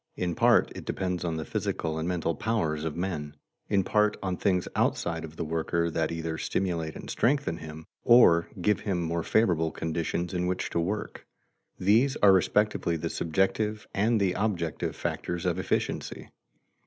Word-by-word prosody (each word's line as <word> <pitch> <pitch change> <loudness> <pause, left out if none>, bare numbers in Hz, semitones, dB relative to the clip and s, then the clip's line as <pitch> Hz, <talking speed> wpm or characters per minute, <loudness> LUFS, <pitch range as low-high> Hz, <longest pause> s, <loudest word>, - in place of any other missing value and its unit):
In 90 -1 -1
part - - +4
it - - -8
depends 90 -2 -2
on 85 -2 -2
the 80 - -4
physical 80 +2 -2
and 80 - -2
mental 85 -2 0
powers 80 -9 -1
of 80 0 -3
men; 80 -5 -3 0.3
in 100 -2 +3
part 105 +2 +2
on 95 -1 -1
things 90 -1 0
outside 85 -1 0
of 80 -1 -9
the 85 - -3
worker 80 +1 -1
that 80 -1 -1
either 80 -1 -3
stimulate 85 -4 -2
and - - -8
strengthen 140 - +1
him, 80 0 -9 0.2
or 85 -9 +6
give 105 +4 +2
him 95 -4 -2
more 85 0 -1
favorable 85 -4 +2
conditions 85 +2 -3
in 90 0 0
which 90 0 -2
to - - 0
work. 100 +5 -3 0.5
These 115 +8 +3
are 100 -2 +6
respectively 95 -2 +2
the 80 +1 -3
subjective 95 +5 0
and 110 +3 +2
the 95 -3 +2
objective 90 -7 -2
factors 85 +1 -3
of 90 0 0
efficiency. - - -2
85 Hz, 165 wpm, -28 LUFS, 80-100 Hz, 0.5 s, or